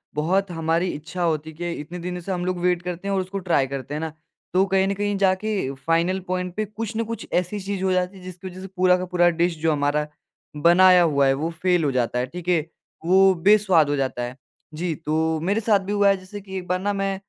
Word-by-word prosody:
बहुत 185 +6 0
हमारी 165 +2 0
इच्छा 160 +4 -5
होती 160 -2 -1
है 160 - -12
कि 175 +2 -4
इतने 170 +4 -8
दिनों 180 +1 -5
से 190 - -5
हम 180 -1 -2
लोग 180 -1 -2
वेट 180 -1 +2
करते 180 +2 -5
हैं 200 - 0
और 190 - +1
उसको 190 +2 -5
ट्राई 170 -7 +1
करते 135 0 -6
हैं 150 - -3
ना, 160 -1 -4 0.4
तो 185 +1 +4
कहीं 195 0 +2
न 200 - 0
कहीं 205 0 -1
जाके 195 -4 0 0.2
फाइनल 170 +3 +2
पॉइंट 180 0 -2
पे 215 - -1
कुछ 215 +2 -6
ना 230 - 0
कुछ 225 -1 -6
ऐसी 180 +4 0
चीज़ 195 0 -4
हो 190 - +2
जाती 185 +1 0
है, 185 - -14
जिसकी 185 +1 -9
वज़ह 185 0 -9
से 190 - -7
पूरा 180 0 +4
का 185 - -4
पूरा 175 -1 +3
डिश 170 0 0
जो 165 0 +2
हमारा 150 0 0 0.5
बनाया 180 +4 +6
हुआ 140 -4 +3
है 135 - +4
वो 150 +4 -2
फ़ेल 180 -2 +3
हो 145 - +1
जाता 125 -1 0
है, 125 - 0
ठीक 175 +6 -9
है। 170 -4 +2 0.4
वो 190 +2 +5
बेस्वाद 195 -8 +5
हो 145 - +1
जाता 130 -3 -2
है, 120 +2 -6 0.4
जी, 165 +2 -2
तो 160 +1 -1
मेरे 200 +5 +1
साथ 210 -2 +3
भी 200 - -3
हुआ 205 -1 +4
है 195 - +3
जैसे 190 +2 -10
कि 190 -1 -7
एक 180 -1 -6
बार 180 +1 0
ना 205 +2 -1
मैं 195 0 -1
180 Hz, 255 wpm, -23 LUFS, 160-190 Hz, 0.5 s, बनाया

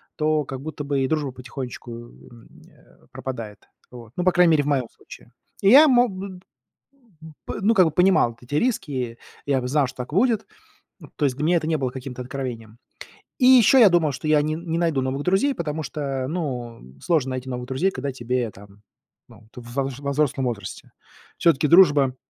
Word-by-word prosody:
то 155 -2 0
как 135 -1 -7
будто 145 -1 -6
бы 140 -1 -1
и 130 - +1
дружба 150 -4 -1
потихонечку, 125 -1 -8
м, 120 0 -13 0.2
э, - - -25
пропадает. 115 -6 -7 0.3
Вот, 120 -1 -12
ну, 180 - 0
по 185 - +4
крайней 175 -1 +4
мере, 150 -2 +3
в - - -6
моем 135 -5 0
случае. 120 - -15 0.3
И 195 - +4
я 290 +7 +8
мог 245 -2 +4 1.4
Бып - - -5
ну, 220 - +4
как 185 -4 +5
бы - - +1
понимал 180 -8 +3
вот 115 - -25
эти 125 +4 -8
риски. 135 - -2 0.3
Я 135 -3 0
знал, 145 +1 +1
что 130 - -10
так 125 +3 -6
и - - -2
будет. 225 -1 +2 0.6
М, - - -14
то 150 - +1
есть 130 -3 0
для 150 - -3
меня 175 +1 +3
это 160 -1 -3
не 160 -1 +1
было 130 -2 -2
каким-то 130 -1 -7
откровением. 120 -5 -7 0.6
И 250 - +3
еще 260 0 +7
я 225 - +8
думал, 170 -4 +2
что 155 - -6
я 150 -1 +4
не 155 +1 -2
не 165 0 -4
найду 165 -5 0
новых 130 +2 -3
друзей, 195 +10 +2
потому 160 -1 -4
что, 135 -2 -4
ну, 125 -9 -4 0.2
сложно 150 -6 +1
найти 130 0 -5
новых 125 -1 -5
друзей, 150 +9 0
когда 140 -1 -4
тебе 125 -1 -2
там, 100 +1 -17 0.5
ну, 110 -2 -18
ты 125 - -10
во 120 +3 -3 0.2
во 140 0 -3
взрослом 140 -1 0
возрасте. 105 -6 -6 0.5
Всё-таки 155 -3 +2
дружба 145 -6 +5
140 Hz, 200 wpm, -23 LUFS, 125-165 Hz, 1.4 s, я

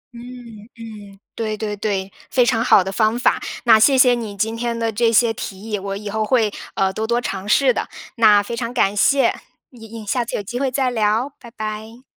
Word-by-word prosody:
嗯 235 -3 -11
嗯， 210 -3 -11
对 215 -2 -3
对 210 -1 -4
对， 195 -2 -3 0.2
非 250 -2 +3
常 235 -2 +1
好 205 - +5
的 190 - -4
方 215 +2 +1
法， 245 - +1 0.2
那 225 -3 +6
谢 265 +5 +5
谢 255 -1 +6
你 220 -4 -5
今 220 +3 -1
天 235 0 -3
的 230 -1 -1
这 230 +2 +1
些 230 +1 +3
提 195 -3 -7
议， 210 0 -4
我 195 0 -5
以 210 +1 -8
后 215 +2 -2
会 220 -2 +1 0.2
呃 190 0 +1
多 220 +3 -3
多 235 +1 +1
尝 195 -3 -5
试 265 +2 +4
的， - - -4 0.3
那 210 -3 +5
非 235 +3 -5
常 235 0 -4
感 205 -5 +1
谢。 275 +7 +3 0.4
你 225 -3 -13
你 225 -1 -9
下 240 +4 0
次 235 - -5
有 205 - -3
机 240 +5 -5
会 275 0 0
再 255 0 0
聊， 225 +4 0
拜 235 - -12
拜。 220 +2 -7
225 Hz, 235 characters per minute, -20 LUFS, 210-240 Hz, 0.4 s, 那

